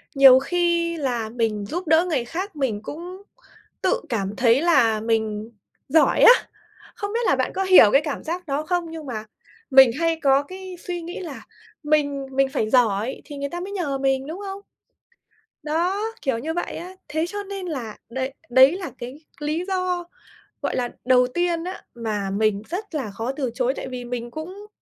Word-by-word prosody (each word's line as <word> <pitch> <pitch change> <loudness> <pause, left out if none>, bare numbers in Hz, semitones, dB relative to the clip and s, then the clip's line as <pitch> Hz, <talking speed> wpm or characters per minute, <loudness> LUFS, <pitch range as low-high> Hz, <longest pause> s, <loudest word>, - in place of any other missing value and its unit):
nhiều 270 -1 +9
khi 340 +2 0
là 245 -7 -2
mình 220 -3 -1
giúp 345 - -4
đỡ 325 +2 +5
người 265 -7 0
khác 370 +9 -5
mình 245 -8 -1
cũng 355 - -8 0.6
tự - - +1
cảm 205 -3 -2
thấy 240 +2 +4
là 250 -10 +4
mình 220 -1 -1 0.4
giỏi 315 +2 +4
á! 485 - +10 0.6
Không 405 +1 -4
biết 465 - +1
là - - +4
bạn - - -1
có 385 - 0
hiểu 370 - +8
cái 275 - +5
cảm 295 -2 -4
giác 345 +2 -4
đó 285 +2 -1
không 355 0 0
nhưng 320 -2 -7
mà 220 -5 -5 0.5
mình 265 -2 +8
hay 330 -1 +1
có 275 0 +4
cái 370 +3 -9
suy 350 -1 -5
nghĩ 345 +2 -6
là 320 -7 -7 0.4
mình 290 -2 +1
mình 270 0 +3
phải 220 -5 -1
giỏi 230 -1 +2
thì 290 -2 -9
người 280 0 -3
ta 345 +4 -5
mới 380 +3 -6
nhờ 300 -8 -1
mình, 270 0 0
đúng 330 +5 -6
không? 390 +1 -6 1.0
Đó, 345 +7 0 0.2
kiểu 265 -4 0
như 315 +7 -3
vậy 350 - -3
á. 365 +2 -8
Thế 315 +2 -1
cho 410 +3 -5
nên 390 -2 -6
là 250 -10 -5
đấy 260 +2 -3 0.2
đấy 260 +3 +7
là 360 -7 -6
cái 250 +4 -7 0.2
lý 305 +3 -2
do, 365 -2 -1 0.6
gọi - - -1
là, 245 -1 -1 0.2
đầu 250 -1 +5
tiên 340 +4 -1
á, 370 +2 -6
mà 210 -4 -3
mình 205 0 +1
rất 370 -1 -5
là 245 -8 -3
khó 225 +6 -3
từ 265 -4 -2
chối, 255 +1 +1
tại - - -6
vì 250 -1 -6
mình 240 -1 -5
cũng 365 +9 -8
285 Hz, 195 wpm, -23 LUFS, 245-350 Hz, 1.0 s, á